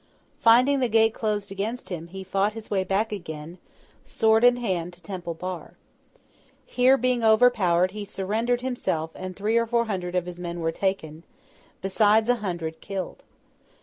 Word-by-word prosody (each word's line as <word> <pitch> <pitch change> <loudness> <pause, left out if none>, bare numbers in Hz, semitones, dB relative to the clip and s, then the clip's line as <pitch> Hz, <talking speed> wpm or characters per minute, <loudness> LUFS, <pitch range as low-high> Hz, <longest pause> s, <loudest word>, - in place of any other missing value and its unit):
Finding 250 +5 +5
the 250 -2 +1
gate 225 0 +4
closed 210 -3 -2
against 215 +5 -4
him, 170 -3 -5
he 190 +2 -8
fought 195 +3 0
his 225 -1 -10
way 195 -2 +1
back 195 +4 0
again, 170 -3 -7 0.4
sword 220 0 +2
in 245 0 +7
hand, 180 -7 -2
to 175 - -18
Temple 175 -2 -5
Bar. 180 +1 -6 0.9
Here, 255 +2 +4
being 250 -1 0
overpowered, 215 -6 +4
he 210 +1 -6
surrendered 220 +5 -1
himself, 170 -11 -2
and 185 0 -7
three 215 +3 0
or 230 0 +2
four 235 0 +1
hundred 185 -4 -3
of 180 -1 +1
his 180 -1 -8
men 175 -1 -5
were 165 -1 0
taken, 165 -4 -2 0.6
besides 215 +3 +3
a 245 - +4
hundred 170 -6 -4
killed. 195 -2 -5
200 Hz, 165 wpm, -25 LUFS, 180-225 Hz, 0.9 s, in